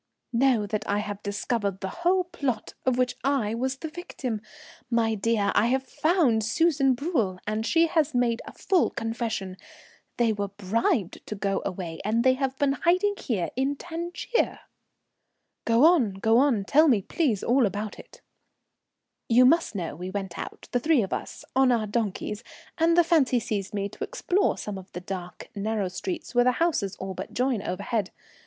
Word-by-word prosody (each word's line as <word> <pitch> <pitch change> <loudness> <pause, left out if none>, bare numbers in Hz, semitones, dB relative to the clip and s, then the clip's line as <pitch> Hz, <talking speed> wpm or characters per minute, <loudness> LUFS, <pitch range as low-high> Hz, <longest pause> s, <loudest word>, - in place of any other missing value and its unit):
"Know 240 -3 +3
that 210 0 -3
I 205 - +2
have 205 -1 -4
discovered 205 -1 -2
the 190 - -4
whole 365 +2 +3
plot 275 -10 -3
of 255 -1 +3
which 250 -1 +1
I 265 -6 +1
was 260 +3 -1
the 320 - -6
victim. 275 -9 -5 0.5
My 230 -2 +2
dear, 215 -1 +1
I 225 - +3
have 260 +2 +1
found 275 - +2
Susan 275 +2 +2
Bruel, 240 - -1
and 215 +1 -1
she 330 0 +4
has 315 -4 +1
made 240 -1 +1
a - - -8
full 375 -3 +1
confession. 225 -5 -3 0.6
They 230 -2 +3
were 205 -1 -2
bribed 200 0 -1
to 215 - -4
go 195 -1 -1
away, 175 -3 -5
and 220 +3 +1
they 260 0 +5
have 265 0 -2
been 280 -1 +2
here - - -9
hiding 345 - +1
in 270 +3 0
Tangier." 345 - -2 1.0
"Go 230 +5 +5
on, 300 - +4
go 225 +4 +3
on. 250 -8 +2
Tell 305 +9 +5
me, 225 -9 +3
please, 245 - 0
all 245 -1 +3
about 205 +2 -5
it." - - -14 1.1
"You 245 +2 +6
must 320 -3 +3
know 170 -6 -3
we 180 +3 -6
went 190 -3 -4
out, - - -7
the 245 - +2
three 300 -2 +3
of 190 - -4
us, - - -5
on 265 -1 +5
our 230 -3 +1
donkeys, 210 0 -2 0.4
and 335 +1 +4
the 345 - +7
fancy 295 -7 +3
seized 210 -3 -3
me 200 -1 -1
to - - -7
explore 405 -5 0
some 205 -2 -5
of 190 0 -14
the 180 - -5
dark, 180 -1 -7
narrow 205 -2 -1
streets 345 - -5
where 245 0 +5
the 250 - +4
houses 295 - 0
all 190 0 -5
but 185 +1 -7
join 250 -3 +1
overhead. 200 +2 -2
230 Hz, 180 wpm, -26 LUFS, 205-275 Hz, 1.1 s, the